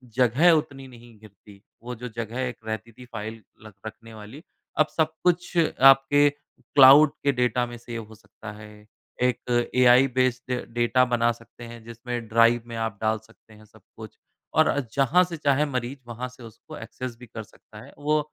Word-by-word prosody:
जगह 130 +7 +4
उतनी 140 -4 -2
नहीं 120 -2 -16
घिरती। 100 -1 -18 0.2
वो 125 +1 -6
जो 125 +2 -8
जगह 115 +1 -6
एक 125 -1 -4
रहती 110 +1 -5
थी 125 +3 -14
फाइल 110 +1 -7 0.2
लख 110 - -12
रखने 110 +1 -10
वाली। 110 +8 -12 0.4
अब 155 - +4
सब 160 -1 +2
कुछ 175 0 0
आपके 145 -2 +5
क्लाउड 140 0 +4
के 140 - +3
डेटा 125 -1 0
में 120 0 -9
सेव 115 -1 -8
हो 110 - -14
सकता 110 0 -12
है। 105 0 -12 0.5
एक 125 -1 +1 0.8
बेस्ड 130 0 0 0.2
डेटा 120 +2 +2
बना 120 -1 +1
सकते 120 +1 -13
हैं 115 -1 -11
जिसमें 115 0 -7
ड्राइव 115 +2 +3
में 115 - -8
आप 115 -2 -3
डाल 110 0 +1
सकते 110 0 -22
हैं 110 0 -17
सब - - -22 0.2
कुछ - - -11 0.4
और 155 -2 +3
जहाँ 140 +7 +3
से 175 -2 -6
चाहें 145 -1 +1
मरीज 125 +2 -4
वहाँ 120 +2 -6
से 125 -1 -16
उसको 115 -1 -12
एक्सेस 120 +2 -8
भी 125 - -11
कर 110 0 -8
सकता 105 0 -17
है। - - -16
वो 150 +1 +1
120 Hz, 180 wpm, -24 LUFS, 115-135 Hz, 0.8 s, आपके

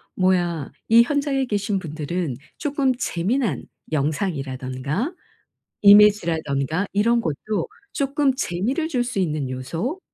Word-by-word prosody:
뭐야 175 -5 +1 0.2
이 230 +1 +8
현장에 280 -1 0
계신 205 -3 -1
분들은 155 -2 -3 0.2
조금 280 -3 0
재미난 205 - -1 0.3
영상이라든가 145 - -2 0.7
이미지라든가 175 -6 +4
이런 230 +4 +2
것도 180 +6 -2 0.3
쪼끔 280 0 +1
재미를 260 - -1
줄 250 -5 +1
수 245 -4 -3
있는 150 -6 -1
요소 165 - -4
190 Hz, 255 characters per minute, -23 LUFS, 155-245 Hz, 0.7 s, 이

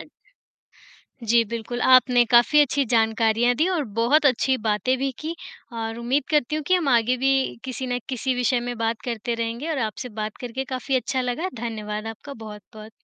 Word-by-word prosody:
अ - - -8 1.2
जी, 230 +1 +4
बिल्कुल। 235 +1 -4
आपने 255 -1 +5
काफ़ी 245 +5 +6
अच्छी 285 -1 +2
जानकारियाँ 225 +1 +2
दी 320 - +2
और 340 -6 0
बहुत 290 +7 +4
अच्छी 260 0 +2
बातें 215 +5 +1
भी 270 +1 -1
की 320 +2 -4 0.4
और 225 0 -4
उम्मीद 255 +4 0
करती 300 -1 +1
हूँ 310 - -3
कि 370 - +3
हम 345 -6 +1
आगे 245 0 +3
भी 265 +2 +1 0.3
किसी 260 0 -5
ना 245 0 -1
किसी 260 0 -1
विषय 245 0 +1
में 245 - -4
बात 225 0 -1
करते 235 -1 -3
रहेंगे 230 +6 -3
और 305 - -1
आपसे 250 +4 -7
बात 215 0 -4
करके 250 +2 -4
काफ़ी 260 +1 -1
अच्छा 255 +1 -1
लगा, 250 +8 -2
धन्यवाद 220 -2 -5
आपका 225 +6 -8
बहुत-बहुत। 215 0 -11
245 Hz, 185 wpm, -23 LUFS, 225-265 Hz, 1.2 s, काफ़ी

